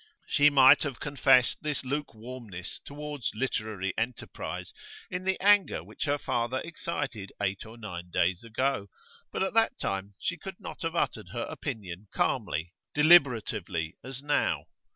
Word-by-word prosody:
She 145 +1 +5
might 135 -3 +8
have 140 -5 -3
confessed 125 -3 +4
this 150 -3 -2
lukewarmness 120 -8 -5
towards 145 -2 -4
literary 110 -5 -2
enterprise 120 +2 -4 0.4
in 180 0 -3
the 190 0 +1
anger 205 0 +4
which - - -5
her 145 0 +2
father 120 -2 -1
excited 140 - -4
eight 100 +1 -1
or 115 +2 -11
nine 90 -6 -7
days 90 +3 +1
ago, 115 -1 0 0.4
but - - 0
at 190 - -1
that 225 +3 +3
time 100 +1 -3
she - - -1
could - - -8
not - - -8
have - - -2
uttered - - -1
her - - -2
opinion 100 -2 -6
calmly, 85 +3 0 0.2
deliberately, 115 - +4
as 135 +2 -6
now. 145 0 +1
125 Hz, 145 wpm, -29 LUFS, 100-145 Hz, 0.4 s, might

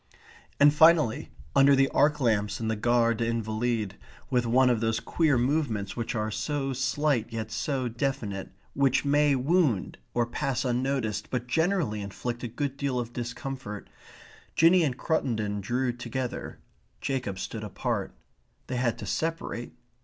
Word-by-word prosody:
And 145 0 +7
finally 160 -6 +4 0.3
under 140 +1 +6
the 135 0 +4
arc 150 +1 +3
lamps 105 -4 +1
in 110 -1 -2
the 110 - 0
Gare 115 +1 +3
des 115 0 -1
Invalides, 110 -2 -1 0.4
with 125 -2 +2
one 125 +2 +4
of 120 - +1
those 115 0 0
queer 155 +1 +1
movements 120 -6 0
which 115 -1 -3
are 110 -1 -1
so 135 +5 -2
slight 130 -2 0
yet 110 -1 -4
so 130 +2 -1
definite, 120 -5 -3 0.2
which 135 0 +2
may 145 0 +4
wound 135 - +1 0.2
or 120 -1 +3
pass 125 +3 -2
unnoticed 125 -4 -1
but 125 -1 -2
generally 160 - 0
inflict 120 +4 -5
a 120 - -3
good 135 +4 -3
deal 140 -3 -1
of 120 -1 -5
discomfort, 120 - -6 0.6
Jinny 170 +3 +6
and 135 -5 0
Cruttendon 110 -11 -1
drew 125 +4 0
together; 120 +1 -5 0.4
Jacob 130 -8 -2
stood 110 +3 -5
apart. 105 - -2 0.5
They 130 - -3
had 120 -2 0
to - - -7
separate. 160 -7 -3
125 Hz, 150 wpm, -28 LUFS, 115-140 Hz, 0.6 s, And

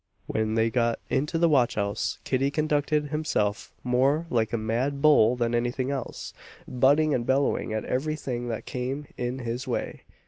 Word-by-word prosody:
When 110 0 -1
they 115 0 +2
got 115 -2 +1
into 150 +5 0
the 170 +1 +4
watch 135 -7 +3
house, 100 -1 -1
Kitty 135 +1 +1
conducted 150 0 0
himself 140 -9 -1
more 135 +6 +2
like 115 -3 +1
a 115 - 0
mad 120 +6 -1
bull 140 -6 +5
than 120 -1 -1
any 120 +1 +1
thing 130 +2 -2
else 135 -3 -5 0.3
butting 145 +5 +3
and 120 - 0
bellowing 135 -2 +1
at 110 0 -2
every 155 +5 -1
thing 120 -5 -4
that 115 -2 -4
came 130 +4 -4
in 125 +1 -3
his 120 +1 -4
way. 125 - -3
125 Hz, 175 wpm, -26 LUFS, 120-145 Hz, 0.3 s, bull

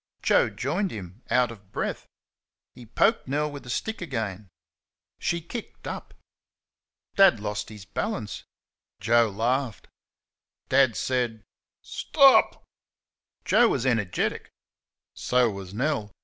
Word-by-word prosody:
Joe - - +4
joined 200 -2 -2
them, 95 - -9
out 125 -2 +3
of 100 -4 -14
breath. - - -3 0.7
He 120 -2 -13
poked 210 - +2
Nell 150 +3 -1
with 145 -1 -8
the 120 - -12
stick 220 - -3
again. 110 - -4 0.7
She 170 -1 -1
"kicked 220 +7 -8
up." - - -7 1.0
Dad 195 - +6
lost 105 0 -4
his 105 -3 -11
balance. 115 - -4 0.6
Joe 120 -1 +3
laughed. 115 +1 -2 0.8
Dad 130 -4 +4
said, 120 0 -1 0.4
"St - - -8
o 275 -2 +9
op!" - - 0 0.8
Joe 240 - +5
was 135 - 0
energetic. 105 -9 0 0.6
So 125 -2 +2
was 100 -2 -8
Nell. 110 -1 -1
120 Hz, 120 wpm, -26 LUFS, 105-145 Hz, 1.0 s, o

